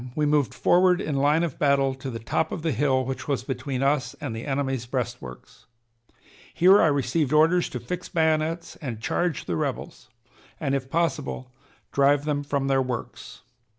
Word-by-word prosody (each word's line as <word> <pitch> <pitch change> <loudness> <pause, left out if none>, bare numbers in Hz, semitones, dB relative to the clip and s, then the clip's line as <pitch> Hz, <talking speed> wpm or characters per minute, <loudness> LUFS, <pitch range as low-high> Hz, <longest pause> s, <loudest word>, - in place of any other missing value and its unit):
we 150 - +1
moved 145 -5 +2
forward 180 0 +3
in 150 - -3
line 145 +4 +2
of 165 -6 -4
battle 140 -2 +3
to 130 0 -7
the 115 - -5
top 115 +8 -1
of 160 - -5
the 165 - +1
hill 130 0 +1
which 135 +1 -5
was 140 -3 -1
between 130 0 -3
us 135 -3 0
and 140 -7 -5
the 115 +5 -6
enemy's 135 -3 -2
breastworks. 120 - -6 0.8
Here 190 +4 +6
I - - +5
received 145 0 0
orders 165 +4 +4
to - - -5
fix 180 0 -6
bayonets 160 0 0
and 120 -7 -6
charge 170 +6 -1
the 85 - -2
rebels, 60 -5 -4 0.5
and, 140 -4 -1
if 135 -1 -2
possible, 145 -5 -2 0.4
drive 140 +1 +3
them 145 -1 0
from 140 -1 -1
their 135 -1 +2
works. 125 -3 -6
140 Hz, 175 wpm, -25 LUFS, 130-155 Hz, 0.8 s, Here